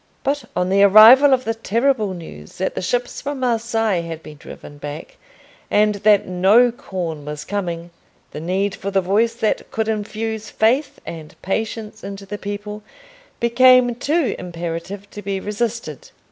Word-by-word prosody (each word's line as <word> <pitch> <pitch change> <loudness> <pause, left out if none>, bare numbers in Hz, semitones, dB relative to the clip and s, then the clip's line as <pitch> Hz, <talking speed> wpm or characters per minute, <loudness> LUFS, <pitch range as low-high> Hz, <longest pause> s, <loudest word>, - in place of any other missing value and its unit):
But 285 +1 -1
on 180 0 0
the 195 +1 +3
arrival 220 +8 +8
of 255 -1 +2
the 225 - 0
terrible 225 -2 0
news 75 - -11
that 190 - -2
the - - -4
ships 245 +7 -2
from 285 -1 -4
Marseilles 225 -6 0
had 165 -1 -7
been 150 -1 -11
driven 145 0 -12
back, 145 +2 -8 0.5
and 210 0 +3
that 205 0 +3
no 195 +7 +4
corn 175 -9 -5
was 150 0 -7
coming, 175 -4 -4 0.4
the - - -7
need 190 +5 -1
for 200 - -5
the 195 -1 +2
voice 210 +5 +1
that 220 -2 -1
could 220 -1 -2
infuse 220 0 -3
faith 260 +6 +1
and 160 -2 -9
patience 215 +2 -4
into 195 0 -7
the 205 +1 -6
people 205 +1 -6 0.6
became 250 +1 +5
too 285 +4 0
imperative 175 +3 -6
to 205 - -8
be 195 -1 -3
resisted. 210 - -4
205 Hz, 160 wpm, -20 LUFS, 180-230 Hz, 0.6 s, arrival